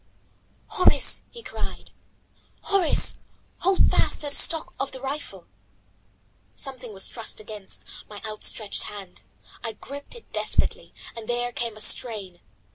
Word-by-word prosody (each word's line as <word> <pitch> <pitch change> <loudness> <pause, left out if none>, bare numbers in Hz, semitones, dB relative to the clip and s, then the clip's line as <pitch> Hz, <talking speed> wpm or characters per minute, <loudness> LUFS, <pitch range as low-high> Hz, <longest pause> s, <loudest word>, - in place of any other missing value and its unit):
"Horace," 365 - +4
he 470 - -11
cried, - - -5 0.7
"Horace, 390 -5 +3 0.4
hold 380 +1 +5
fast - - +3
to 295 - +2
the 285 - +3
stock 325 -1 +6
of 275 - -2
the 260 - -4
rifle." 275 +3 -4 1.1
Something 255 -4 -4
was 195 -2 +1
thrust 230 -2 -4
against 210 -2 -6 0.3
my 205 -1 -8
outstretched 215 0 -1
hand. 195 -3 -9 0.4
I 225 -2 -2
gripped 285 - -7
it 470 - -14
despairingly, - - +1 0.2
and 225 -2 -7
there 240 0 0
came 235 -3 -3
a - - -1
strain. 210 -5 +1
240 Hz, 130 wpm, -26 LUFS, 215-285 Hz, 1.1 s, stock